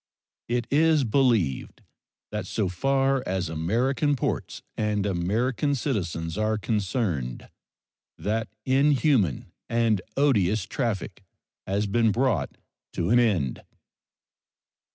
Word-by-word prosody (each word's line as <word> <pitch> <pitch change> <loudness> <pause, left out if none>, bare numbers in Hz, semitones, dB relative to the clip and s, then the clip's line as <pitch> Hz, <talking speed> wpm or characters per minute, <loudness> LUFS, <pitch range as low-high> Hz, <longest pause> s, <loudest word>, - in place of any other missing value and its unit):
It 120 0 0
is 155 0 +4
believed 115 - +1 0.5
that - - -4
so 105 -4 -1
far 135 +7 +1
as 95 -2 -1
American 120 - +1
ports 125 - -3
and 105 -2 0
American 110 +10 0
citizens 90 - -2
are 110 0 +1
concerned 100 - -2 0.7
that 110 +2 -2 0.2
inhuman 135 - +2 0.2
and 115 -4 +2 0.2
odious 110 -8 +3
traffic 100 -6 -3 0.4
has 100 +2 0
been 115 +2 +2
brought 115 - 0 0.4
to 85 +3 -1
an 120 - +6
end. 95 - +1
110 Hz, 100 wpm, -26 LUFS, 95-130 Hz, 0.7 s, an